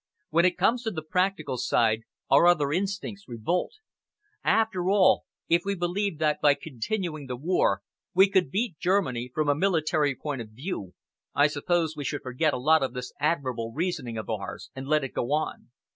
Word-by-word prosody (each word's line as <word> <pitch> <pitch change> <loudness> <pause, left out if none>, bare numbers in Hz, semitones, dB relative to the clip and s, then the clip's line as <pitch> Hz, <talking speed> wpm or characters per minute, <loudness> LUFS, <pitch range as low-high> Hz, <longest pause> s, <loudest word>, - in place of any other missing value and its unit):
When 170 +2 +4
it 180 - +2
comes 240 +1 +2
to 230 - -2
the 160 -7 -5
practical 180 -5 0
side, 115 -1 +2 0.2
our 140 +6 +6
other 150 -5 +3
instincts 200 +2 -3
revolt. 125 - -2 0.7
After 205 -5 +2
all, 190 -2 +4 0.2
if 170 +1 +3
we 200 0 -1
believed 180 +1 -1
that 150 -1 +1
by 145 -1 +5
continuing 155 - -4
the 125 - -3
war 125 - +1 0.3
we 190 +2 +7
could 190 -6 +2
beat 200 - -2
Germany 130 -11 0
from 155 +3 -1
a 145 - +5
military 155 -4 +1
point 140 -1 -4
of 110 - -9
view, 110 - -6 0.4
I 145 - +5
suppose 160 +2 0
we 145 - -5
should 145 +2 -3
forget 130 +5 +1
a - - -2
lot 155 +5 +4
of 130 -2 -1
this 125 0 -6
admirable 130 -7 -1
reasoning 160 -9 -2
of 110 - -5
ours - - -5
and 135 0 -6
let 155 0 +2
it 135 - -5
go 120 - -2
on." 155 -4 -2
155 Hz, 185 wpm, -27 LUFS, 130-185 Hz, 0.7 s, we